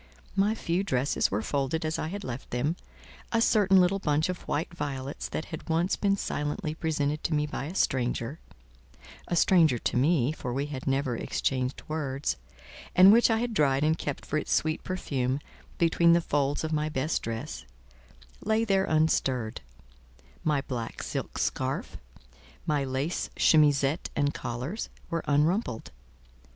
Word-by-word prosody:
My 200 +3 +2
few 175 -2 -1
dresses 130 -6 +1
were 105 +3 -1
folded 145 +3 -1
as 155 0 -1
I - - -2
had 200 +4 -5
left 130 -5 -6
them; 140 +7 0 0.6
a 230 - +2
certain 200 -4 +5
little 185 +2 +3
bunch 150 -1 +1
of 180 - -3
white 160 +3 -2
violets 140 -3 -4
that 160 - -3
had 160 - -7
once 165 +3 +2
been 200 -1 +1
silently 150 0 -2
presented 155 -2 -1
to 160 - 0
me 150 0 +1
by 150 -2 -4
a 165 +6 -6
stranger 125 0 0 0.9
(a 175 - -1
stranger 165 -7 +5
to 120 - -1
me, 140 -1 +3
for 125 -5 -5
we 140 +3 -1
had 145 -3 -6
never 135 -2 +1
exchanged 130 +2 -2
words), 140 - -2 0.6
and 190 +3 +9
which 235 +2 +5
I 225 - +3
had 235 0 -2
dried 140 -6 +2
and 155 +1 +3
kept 145 -3 -5
for 155 - 0
its - - -5
sweet 155 0 +1
perfume 135 -8 -1 0.4
between 170 0 +4
the 170 - +5
folds 145 -2 0
of 160 0 -2
my 155 0 0
best 150 +2 -1
dress, 115 +6 -5 0.8
lay 220 +2 +2
there 195 -2 +2
unstirred; 130 -7 +1 0.8
my 150 -3 +2
black 120 -4 -5
silk - - -4
scarf, - - -2 0.7
my 150 -2 +1
lace 135 +5 -2
chemisette 145 -1 +4
and 145 0 +1
collars, 125 - -4 0.2
were 165 0 -1
unrumpled. 150 - +1
150 Hz, 160 wpm, -28 LUFS, 135-170 Hz, 0.9 s, and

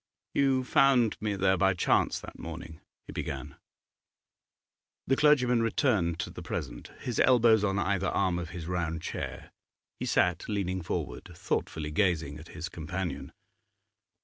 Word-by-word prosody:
'You 135 -2 +3
found 125 -3 +4
me 105 -1 -1
there 95 0 +2
by 95 +1 +3
chance - - +2
that - - -11
morning?' 85 -1 -8 0.2
he - - -9
began. 75 -2 -5 1.5
The 135 - +3
clergyman 125 -5 +4
returned 110 - +1
to - - -5
the - - -8
present. - - -5
His 120 -3 -3
elbows 115 -4 +5
on 100 -1 +1
either 100 -1 0
arm 90 -2 +1
of 85 -2 -5
his 85 -2 -7
round 85 -2 -2
chair, - - -5 0.5
he - - -3
sat 90 +2 +1
leaning 95 -3 -1
forward, 80 - -4
thoughtfully 75 -2 -2
gazing 80 -4 0
at 80 - -12
his 80 0 -6
companion. 85 +3 -5
95 Hz, 145 wpm, -29 LUFS, 85-115 Hz, 1.5 s, elbows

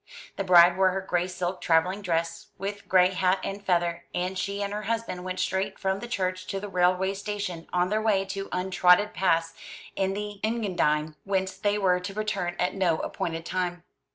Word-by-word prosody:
The 195 - -2
bride 175 -1 +7
wore 190 -1 +5
her 195 - -2
gray 180 -1 0
silk 185 0 -3
travelling 180 +5 +2
dress, 165 +1 -2
with 200 +1 -5
gray 185 -1 +5
hat 185 0 +2
and 200 +1 -5
feather, 175 -2 0
and 180 +2 -1
she 200 +2 -2
and 200 0 -3
her 210 - -3
husband 225 -4 -3
went 185 0 -4
straight 190 +1 -1
from 190 0 -1
the 240 - -6
church 185 -4 -2
to 195 - -3
the 205 - -6
railway 185 +1 +2
station, 200 -4 -5
on 180 0 +1
their 215 +1 +1
way 205 -3 +2
to 195 0 -5
untrodden 180 +2 +3
paths 165 -4 +1 0.4
in 195 0 0
the 205 0 -5
Engadine, 175 -9 0
whence 190 -1 -1
they 205 +1 0
were 185 -3 +2
to 195 +2 -7
return 210 -5 -2
at 180 - 0
no 180 -5 +1
appointed 165 0 -4
time. 175 -1 -2
185 Hz, 190 wpm, -27 LUFS, 180-200 Hz, 0.4 s, bride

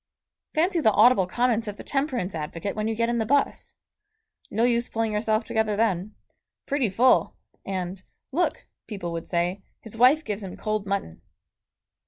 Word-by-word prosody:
Fancy 345 +3 +2
the 260 - +4
audible 210 -3 +5
comments 230 +1 +1
of 205 -1 -5
the - - -9
temperance 265 -9 -1
advocate 165 +5 -4
when 215 0 -1
you 225 - -1
get 230 +1 +1
in 235 0 0
the - - +2
bus! 285 +3 0 0.7
No 225 +3 0
use 240 0 +2
pulling 225 -1 -1
yourself 215 +1 +1
together 220 -1 0
then. 210 -2 0 0.5
"Pretty 275 -5 0
full!" 245 +7 +3 0.3
And 185 -1 -4 0.3
"Look," 345 +6 0 0.2
people 195 -6 -5
would 165 -1 -5
say, 175 +2 -1 0.2
"his 220 -1 -11
wife 260 +7 +5
gives 210 0 -3
him 190 -2 -7
cold 215 -1 -2
mutton." 195 - -3
215 Hz, 165 wpm, -25 LUFS, 195-240 Hz, 0.7 s, audible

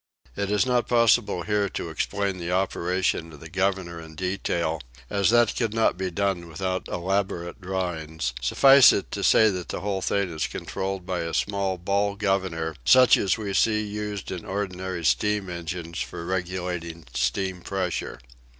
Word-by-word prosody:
It 100 -1 -2
is 105 +2 +2
not 125 -2 +1
possible 115 -6 +3
here 105 +2 0
to 85 - -5
explain 100 +3 -2
the 85 0 -3
operation 90 -2 0
of 75 - -12
the 80 +2 -11
governor 95 -3 -1
in 80 -1 -11
detail, 85 -3 -1 0.3
as 100 -3 +2
that 120 -2 +4
could 115 -2 -1
not 115 - +3
be 95 +1 -2
done 90 -1 -1
without 95 +3 -3
elaborate 95 0 -2
drawings; 80 -7 -3
suffice 135 - +7
it 100 - -2
to 100 - -3
say 110 +2 +5
that 90 -2 -5
the - - -4
whole 100 -1 -2
thing 100 -2 0
is 80 - -1
controlled 95 -1 -4
by 90 -1 -2
a 85 0 -3
small 100 -2 0
ball 100 +3 0
governor 95 -6 -1
such 125 - +7
as 95 +1 +1
we 105 -3 -4
see 105 +2 +2
used 105 -1 -5
in 90 -3 -5
ordinary 95 -3 -4
steam 105 +4 +1
engines 85 0 -5
for 85 - -5
regulating 90 -3 -3
steam 90 +9 -1
pressure. 95 -1 -3
95 Hz, 165 wpm, -25 LUFS, 85-100 Hz, 0.3 s, suffice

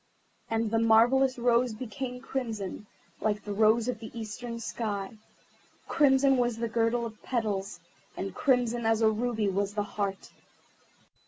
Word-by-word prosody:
And 225 -1 0
the 225 - +2
marvellous 245 +4 +4
rose 240 -1 +2
became 250 +2 -5
crimson, 220 -7 -4 0.3
like 210 -1 -1
the 205 - -4
rose 220 +2 +3
of 245 -3 -2
the 220 - -8
eastern 230 +2 -6
sky. 210 -4 -3 0.8
Crimson 270 -3 +4
was 240 -2 +1
the 235 0 -1
girdle 230 +1 +1
of 220 -2 -9
petals, 210 -5 -2 0.4
and - - -4
crimson 240 -3 +1
as 225 0 +2
a 220 - +5
ruby 220 -1 -1
was 200 +1 -1
the 205 - 0
heart. 200 -1 -4
225 Hz, 145 wpm, -29 LUFS, 215-245 Hz, 0.8 s, a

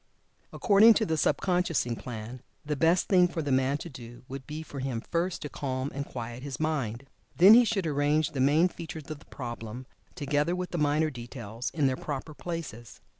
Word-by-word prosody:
According 215 +2 +6
to 220 - +2
the 160 - 0
Sub 150 -2 +2
consciousing 175 -10 0
plan, 120 +1 -7 0.2
the 150 0 -1
best 165 +5 +3
thing 180 -2 +5
for 170 -2 -4
the 145 - -2
man 130 +2 +2
to 160 - -8
do 120 -5 -11
would 135 0 -8
be 155 +1 -5
for 145 -3 -8
him 130 -3 -2
first 170 +7 -2
to 150 - -5
calm 130 -1 -3
and 140 +1 -4
quiet 120 0 -6
his 135 -2 -6
mind. 135 -6 -2 0.3
Then 190 +5 +9
he 245 +2 +8
should 205 -5 0
arrange 150 0 +1
the 135 - -4
main 150 +6 +4
features 160 -3 -8
of 155 - -6
the - - -19
problem, 120 -1 -7 0.3
together 150 +1 0
with 180 0 -4
the 175 - -2
minor 150 +1 +2
details 120 -2 -6
in 150 -4 0
their 130 -1 +1
proper 145 +1 -5
places. 145 - -7
145 Hz, 200 wpm, -28 LUFS, 130-165 Hz, 0.3 s, Then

